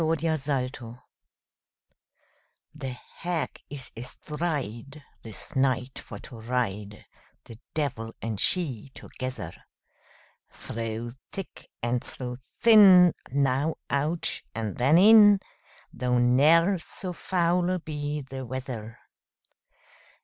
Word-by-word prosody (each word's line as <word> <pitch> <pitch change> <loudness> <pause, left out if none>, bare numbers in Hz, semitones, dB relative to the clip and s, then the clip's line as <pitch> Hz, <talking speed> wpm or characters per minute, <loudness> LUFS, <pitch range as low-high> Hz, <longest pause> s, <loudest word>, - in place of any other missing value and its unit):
THE 160 0 +2
HAG 140 -4 -1 1.9
The 145 -3 -5 0.3
Hag 175 -2 -3
is 135 -3 -6
astride, 140 +1 -5 0.2
This 115 +7 -9
night 130 -1 0
for - - -9
to 115 - -11
ride, 105 -3 -3 0.4
The 115 -1 -13 0.2
devil 115 -7 -2
and 110 -3 -4
she 140 - +1
together; 125 -10 -6 1.0
Through 115 +1 -5 0.2
thick 195 - -8
and 120 +1 0
through 125 -1 -6
thin, 185 - +6 0.2
Now 140 +3 +1 0.2
out, 150 +4 0
and 110 -3 -3
then 135 +6 +4
in, 205 +1 +8 0.5
Though 125 0 0
ne'er 155 +10 +4
so 180 +2 -6
foul 180 +1 +1
be 150 -2 -4
the 130 0 -7
weather. 120 -3 -6
135 Hz, 100 wpm, -27 LUFS, 120-165 Hz, 1.9 s, in